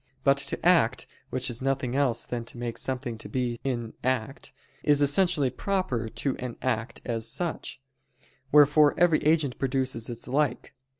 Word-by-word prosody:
But 140 0 +4
to 140 +3 -3
act, 165 -9 +4 0.2
which 130 - -1
is 120 0 -3
nothing 135 -1 -1
else 130 -5 +1
than 120 -1 -4
to 120 - -9
make 120 -1 -4
something 125 -3 -3
to - - -8
be 120 -2 -2
in 120 -4 -3
act, 130 +1 -2 0.3
is 145 -1 +3
essentially 145 -2 +3
proper 160 - -2
to 135 +4 -2
an 125 -2 -6
act 120 -1 -2
as 115 -2 -2
such; 170 -4 -3 0.7
wherefore 150 0 +5
every 170 -3 +4
agent 150 -4 +1
produces 130 -3 -1
its 120 -1 -5
like. 140 0 -1
130 Hz, 160 wpm, -27 LUFS, 120-145 Hz, 0.7 s, wherefore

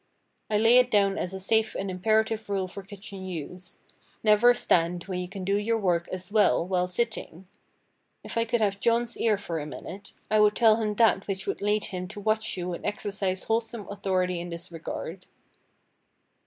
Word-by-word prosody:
I 210 - +2
lay 225 +3 +6
it 250 -1 +3
down 200 -3 +3
as 180 - -2
a 190 - -5
safe 220 +3 +1
and 195 0 -3
imperative 220 +3 +1
rule 195 -2 -1
for 200 +2 -8
kitchen 195 -1 -9
use—Never 190 +6 0
stand 175 -5 +2
when 185 -1 -4
you 180 - -4
can 190 +1 -7
do 195 +2 +1
your 225 +2 0
work 175 -5 0
as 185 +1 -6
well 210 -5 +3
while 180 -1 0
sitting. 190 -3 -3 0.8
If - - -7
I 230 - +2
could 230 0 0
have 200 -2 +1
John's 235 +1 +1
ear 220 -3 +2
for 170 -5 -4
a 150 - -5
minute, 195 +6 -9 0.2
I 215 - +4
would 210 0 +5
tell 225 -2 +5
him 215 -2 -1
that 220 -3 +3
which 195 -1 -3
would - - -3
lead 210 +1 +1
him 185 -2 -5
to 205 +2 -8
watch 215 0 0
you 180 0 -3
and - - -7
exercise 195 -2 -2
wholesome 225 -1 -2
authority 185 -3 -1
in 175 +1 -6
this 170 0 -5
regard. 165 +2 -6
200 Hz, 190 wpm, -27 LUFS, 180-220 Hz, 0.8 s, lay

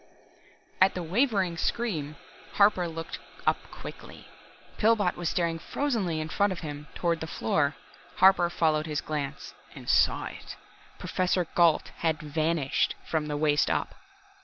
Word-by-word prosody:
At 190 - +5
the 180 - -3
wavering 190 - +1
scream, 160 -8 -2 0.4
Harper 200 -3 +4
looked 165 0 -6 0.3
up - - +3
quickly. - - -10 0.5
Pillbot 210 -4 +3
was 175 -1 -2
staring 170 -2 0
frozenly 200 - -1
in 155 - -3
front 200 +4 +1
of 185 - -5
him, 150 -2 -7
toward 170 -2 0
the 160 - -5
floor. 140 +3 0 0.4
Harper 190 -2 +5
followed 155 -2 +1
his 150 -1 -1
glance 145 -2 -4 0.2
and - - -11
saw - - +3
it. - - -8 0.4
Professor 180 -1 0
Gault 170 -3 +4
had 160 -2 0
vanished 155 -1 0
from 155 -2 -1
the 150 -1 -2
waist 150 0 +2
up. - - -1
165 Hz, 140 wpm, -28 LUFS, 155-185 Hz, 0.5 s, At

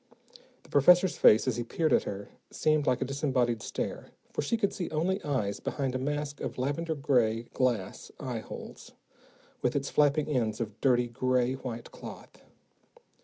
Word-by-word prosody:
The - - -19
professor's 180 +5 +5
face, 110 +4 +6
as 125 - 0
he 120 - -1
peered 155 +6 0
at - - +3
her, 100 0 -5 0.2
seemed 155 -1 +1
like 130 +1 +2
a - - -3
disembodied 130 -4 0
stare, - - -4 0.3
for - - -1
she 230 +11 0
could 200 -3 0
see 175 - -4
only 180 +6 -1
eyes 110 -9 -1
behind 135 -3 -2
a 130 - -1
mask 145 +1 -3
of - - -4
lavender 145 +5 -1
gray 120 -6 +2
glass 120 -7 -1
eyeholes, - - -7 0.7
with 125 +1 0
its 140 0 -1
flapping 150 0 +3
ends 115 -7 0
of 110 -2 -5
dirty, 125 -2 +3
gray 125 +1 +1
white 125 -3 -6
cloth. - - -11
130 Hz, 165 wpm, -29 LUFS, 120-150 Hz, 0.7 s, face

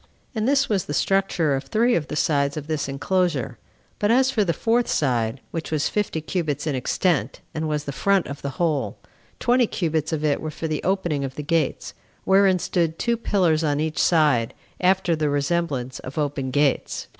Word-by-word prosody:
And 220 -1 -1
this 280 0 +3
was 200 -7 0
the 145 - -3
structure 190 -4 +1
of 135 +1 -4
three 230 - +2
of 155 -7 0
the - - -5
sides 140 -1 +1
of 150 - -5
this 155 -2 -2
enclosure; 140 - -1 0.4
but 205 - +1
as 260 +3 +4
for 225 -6 +2
the 175 - +1
fourth 230 +7 +1
side, 125 -3 0
which 165 -1 -4
was 155 -2 0
fifty 205 -6 -1
cubits 155 -3 -2
in 150 - 0
extent, 135 - 0
and 155 0 -2
was 150 -1 -1
the 145 - -4
front 195 +6 +2
of 140 0 -7
the 140 - -3
whole, 160 -6 0 0.4
twenty 245 -1 +3
cubits 160 -5 -1
of 155 -2 -2
it 145 -2 +1
were 155 - -3
for 160 +1 -5
the 155 -1 -2
opening 175 -7 0
of 135 -1 -5
the 150 - -5
gates, 160 -1 -1 0.3
wherein 190 -1 +4
stood 165 -2 -1
two 235 -1 +1
pillars 180 -8 +1
on 145 -2 +1
each 155 +2 -2
side, 150 -9 +3 0.2
after 185 -2 +2
the 155 -1 0
resemblance 145 -3 -1
of 130 - -9
open 140 -3 -1
gates. 140 +1 0
155 Hz, 195 wpm, -23 LUFS, 145-190 Hz, 0.4 s, as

